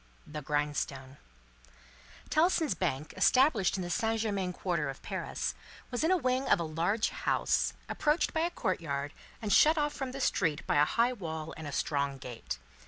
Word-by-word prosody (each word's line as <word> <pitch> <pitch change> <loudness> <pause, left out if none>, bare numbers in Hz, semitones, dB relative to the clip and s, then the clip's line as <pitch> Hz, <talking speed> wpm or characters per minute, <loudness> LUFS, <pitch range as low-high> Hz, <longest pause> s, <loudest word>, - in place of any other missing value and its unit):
The 150 0 -6
Grindstone 140 -2 -2 1.1
Tellson's 320 - +3
Bank, 150 -2 -2
established 220 - +4
in 185 - -2
the 175 - -4
Saint 225 +3 +1
Germain 200 -4 -1
Quarter 170 -5 -1
of 135 - -8
Paris, - - -3 0.4
was 245 +4 -1
in 320 - +3
a 370 - +5
wing 255 -3 0
of - - +5
a - - 0
large 170 +8 0
house, - - +1
approached 300 +2 +1
by 320 - 0
a 340 - +2
courtyard 145 - -2 0.3
and 210 - +1
shut 315 +2 +6
off 295 -1 +1
from 270 -3 -4
the 270 - -6
street 165 - +1
by - - +1
a 145 - +6
high 235 +8 +2
wall 160 -7 -5
and 160 -1 -7
a - - -5
strong 140 -1 -1
gate. 120 - -6
180 Hz, 175 wpm, -31 LUFS, -, 1.1 s, shut